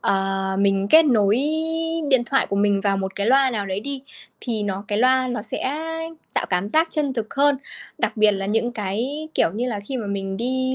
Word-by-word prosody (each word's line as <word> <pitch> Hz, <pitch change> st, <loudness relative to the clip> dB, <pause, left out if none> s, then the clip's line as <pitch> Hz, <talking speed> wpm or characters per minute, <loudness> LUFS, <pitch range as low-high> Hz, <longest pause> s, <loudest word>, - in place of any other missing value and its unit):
ờ, 195 Hz, 0 st, 0 dB, 0.2 s
mình 195 Hz, 0 st, +2 dB
kết 320 Hz, +1 st, +8 dB
nối 215 Hz, -7 st, +3 dB, 0.7 s
điện 250 Hz, -2 st, +4 dB
thoại 270 Hz, -, +2 dB
của 200 Hz, -, -2 dB
mình 200 Hz, -1 st, +2 dB
vào 195 Hz, -1 st, +1 dB
một 190 Hz, 0 st, -3 dB
cái 200 Hz, -, -1 dB
loa 265 Hz, +2 st, +4 dB
nào 210 Hz, -4 st, -3 dB
đấy 190 Hz, +1 st, -3 dB
đi, 275 Hz, +3 st, -5 dB, 0.4 s
thì 225 Hz, -4 st, -2 dB
nó 200 Hz, -1 st, -3 dB
cái 205 Hz, -, 0 dB
loa 255 Hz, +1 st, +3 dB
nó 240 Hz, -4 st, -3 dB
sẽ 280 Hz, +7 st, -3 dB, 0.6 s
tạo -, -, 0 dB
cảm 180 Hz, +2 st, 0 dB
giác 320 Hz, +8 st, +2 dB
chân 295 Hz, -4 st, -1 dB
thực 230 Hz, -4 st, -4 dB
hơn. 280 Hz, 0 st, +4 dB, 0.4 s
Đặc -, -, -1 dB
biệt 215 Hz, -1 st, +5 dB
là 195 Hz, -1 st, -3 dB
những 225 Hz, +4 st, 0 dB
cái, 240 Hz, +10 st, -3 dB
kiểu -, -, +3 dB
như 245 Hz, +4 st, -1 dB
là, 210 Hz, -4 st, -3 dB
khi 235 Hz, +7 st, -5 dB
mà 225 Hz, -5 st, -4 dB
mình 195 Hz, -1 st, -3 dB
đi 260 Hz, +3 st, -1 dB
220 Hz, 220 wpm, -22 LUFS, 200-260 Hz, 0.7 s, kết